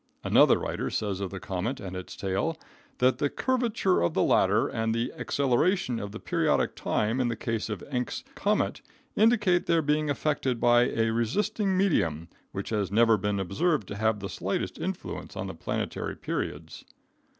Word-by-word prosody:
Another - - +5
writer - - -3
says 100 -3 -2
of 100 -2 -3
the 95 - -6
comet 105 +6 -3
and 95 -2 -6
its 90 0 -7
tail 100 - -1 0.4
that 125 0 +3
"the 145 -1 +1
curvature 235 - +1
of 85 - 0
the - - +3
latter - - +3
and 115 0 -1
the 115 +2 -1
acceleration 140 -1 +1
of 100 0 -5
the 110 - -7
periodic - - +1
time 110 +4 0
in 125 - +2
the 120 - -1
case 115 0 -3
of 105 -5 -4
Encke's 125 -4 -3
comet - - 0 0.3
indicate 210 -5 +3
their 165 -1 +3
being 150 +1 +1
affected 135 -3 0
by 120 +1 +4
a 115 0 +1
resisting 195 - 0
medium 85 - +1 0.2
which - - -5
has 105 -4 0
never 115 +1 +5
been 105 0 -1
observed 105 - 0
to - - -5
have 110 0 0
the 100 - -3
slightest 90 - -3
influence - - -5
on - - -3
the - - -5
planetary - - -3
periods." 80 +1 -5
115 Hz, 170 wpm, -28 LUFS, 100-155 Hz, 0.4 s, Another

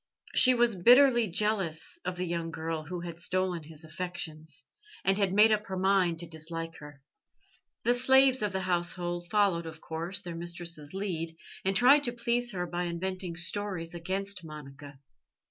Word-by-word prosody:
She 255 0 +6
was 240 -1 +3
bitterly 240 +4 +6
jealous 190 -4 -1
of 180 0 -3
the 180 +1 -2
young 170 -1 -3
girl 160 -1 -4
who 175 +2 -5
had 170 -1 -7
stolen 185 -1 -1
his 155 +1 -11
affections, 160 -3 -5 0.4
and 195 - +4
had 195 -2 +1
made 210 +3 +6
up 215 0 0
her 190 - -4
mind 185 -3 +2
to 170 - -7
dislike 165 +1 -5
her. 145 -2 -13 0.8
The 240 - +3
slaves 260 +1 +5
of 210 -2 +1
the 190 0 -2
household 175 -1 -2
followed, 190 -5 +2
of 160 0 -9
course, 165 +4 -3
their 175 - -7
mistress's 170 -2 -5
lead, 165 -5 -3 0.3
and 195 +1 0
tried 270 +7 +6
to 240 - -1
please 240 0 0
her 180 -3 -3
by 175 0 -3
inventing 180 0 -3
stories 175 -1 -2
against 190 +2 -3
Monica. 145 -2 -11
180 Hz, 165 wpm, -29 LUFS, 165-200 Hz, 0.8 s, She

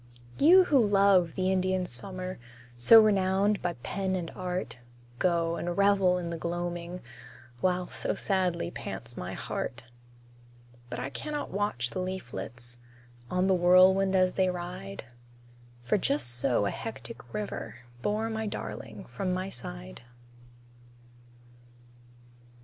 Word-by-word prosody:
You 360 +6 +8
who 295 -6 +3
love 195 -4 +4
the 185 0 +1
Indian 185 0 +1
summer, 185 +7 -4 0.4
So 120 - +8
renowned 200 -1 +3
by 175 - -1
pen 190 -1 -2
and 175 -3 -4
art, 180 -8 -4 0.4
Go, 170 -2 +1
and 175 0 -3
revel 200 -2 +4
in 170 -1 -4
the 165 - -5
gloaming, 175 +1 -4 0.6
While 180 +2 0
so - - -3
sadly 185 -3 -1
pants - - -7
my - - -5
heart. 120 - -4 1.1
But - - -5
I 135 - -4
can 300 - -5
not 295 - -3
watch 185 - 0
the - - -4
leaflets, 120 - -6 0.5
On 180 +1 +1
the 190 - +3
whirlwind 185 +2 +5
as 185 -1 +3
they 190 -1 +2
ride, 175 - -6 0.8
For 120 - +1
just 140 -7 +1
so 120 -3 +1
a 100 - 0
hectic 230 +1 -8
river 210 -1 -5 0.3
Bore 215 - 0
my 220 0 -2
darling 110 - -6
from 155 +11 -3
my 185 +1 -2
side. - - -8
185 Hz, 130 wpm, -29 LUFS, 165-195 Hz, 1.1 s, You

